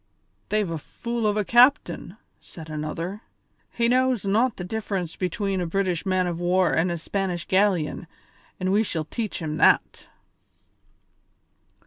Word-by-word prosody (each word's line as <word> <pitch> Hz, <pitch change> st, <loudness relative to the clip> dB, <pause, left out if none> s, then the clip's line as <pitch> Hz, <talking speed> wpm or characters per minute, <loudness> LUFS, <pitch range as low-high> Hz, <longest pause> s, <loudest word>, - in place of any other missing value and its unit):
"They've 210 Hz, -2 st, +1 dB
a 165 Hz, -, -3 dB
fool 235 Hz, +7 st, -3 dB
of 210 Hz, 0 st, +1 dB
a 210 Hz, -, 0 dB
captain," 250 Hz, +6 st, +3 dB, 0.2 s
said 160 Hz, -2 st, -11 dB
another; 165 Hz, +6 st, -4 dB, 0.5 s
"he 235 Hz, 0 st, +1 dB
knows 255 Hz, -3 st, +2 dB
not 220 Hz, +4 st, +2 dB
the 180 Hz, -, -5 dB
difference 195 Hz, -4 st, -3 dB
between 195 Hz, +1 st, -2 dB
a 175 Hz, -, -2 dB
British 185 Hz, 0 st, -1 dB
man 185 Hz, -1 st, +2 dB
of 170 Hz, -1 st, -3 dB
war 180 Hz, 0 st, +2 dB
and 170 Hz, +3 st, +2 dB
a 170 Hz, -, -2 dB
Spanish 180 Hz, 0 st, -3 dB
galleon, 185 Hz, -5 st, +1 dB, 0.5 s
but 185 Hz, -, -2 dB
we 205 Hz, +3 st, +3 dB
shall 165 Hz, -7 st, -2 dB
teach 220 Hz, +5 st, -4 dB
him 155 Hz, -1 st, -3 dB
that." -, -, +3 dB
190 Hz, 145 wpm, -25 LUFS, 170-215 Hz, 0.5 s, captain